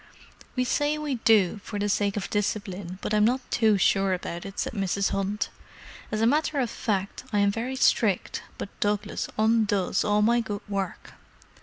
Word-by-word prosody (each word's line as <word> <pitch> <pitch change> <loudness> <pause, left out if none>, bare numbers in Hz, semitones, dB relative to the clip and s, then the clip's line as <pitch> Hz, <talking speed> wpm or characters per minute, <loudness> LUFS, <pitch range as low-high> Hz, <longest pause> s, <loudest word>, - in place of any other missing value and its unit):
"We 255 - +2
say 290 +4 +1
we 300 -2 -2
do, 215 -3 +3
for 210 - -5
the 205 0 0
sake 200 0 +1
of 205 - -2
discipline, 200 -3 -2
but - - -2
I'm 210 0 +4
not 245 +4 +3
too 220 -3 +4
sure 195 0 +3
about 175 0 -4
it," 195 - -10
said - - -2
Mrs. 195 -1 0
Hunt. 195 +1 -1 0.6
"As 215 0 -1
a - - +4
matter 295 +3 +2
of 245 -4 0
fact, 200 -1 -2
I 210 - 0
am 200 0 +4
very 235 +5 -3
strict, 220 -6 +2 0.2
but - - -5
Douglas 205 0 -1
undoes 215 -4 +2
all 210 0 +2
my 235 +2 +4
good 205 -3 -4
work. 195 -3 -4
210 Hz, 180 wpm, -26 LUFS, 195-225 Hz, 0.6 s, I'm